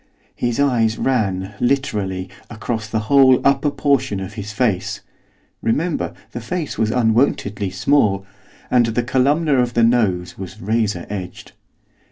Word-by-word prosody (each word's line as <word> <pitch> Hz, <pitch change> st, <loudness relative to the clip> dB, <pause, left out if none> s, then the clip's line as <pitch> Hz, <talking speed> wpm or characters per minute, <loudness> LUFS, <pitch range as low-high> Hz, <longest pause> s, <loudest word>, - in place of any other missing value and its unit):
His 120 Hz, +1 st, -2 dB
eyes 115 Hz, -6 st, +2 dB
ran, 100 Hz, -6 st, -1 dB
literally, 105 Hz, -8 st, -1 dB, 0.2 s
across 110 Hz, -1 st, -4 dB
the 110 Hz, -1 st, -1 dB
whole 130 Hz, +3 st, +5 dB
of -, -, -4 dB
the -, -, +6 dB
upper 140 Hz, +2 st, +1 dB
portion 135 Hz, -7 st, 0 dB
of 95 Hz, +1 st, -6 dB
his 105 Hz, -1 st, -6 dB
face, 105 Hz, -4 st, -1 dB, 0.6 s
remember, 155 Hz, +9 st, -1 dB, 0.2 s
the 120 Hz, -, -6 dB
face 160 Hz, +5 st, -4 dB
was 110 Hz, 0 st, 0 dB
unwontedly 110 Hz, -4 st, +1 dB
small, 100 Hz, -1 st, +1 dB, 0.5 s
and 120 Hz, -2 st, +4 dB
the 115 Hz, +2 st, 0 dB
columna 140 Hz, +4 st, +2 dB
of 120 Hz, -1 st, -2 dB
the 120 Hz, -, +4 dB
nose 105 Hz, -8 st, +1 dB
was 95 Hz, +2 st, -8 dB
razor 105 Hz, -4 st, -1 dB
edged. 95 Hz, -3 st, -7 dB
115 Hz, 145 wpm, -20 LUFS, 100-130 Hz, 0.6 s, the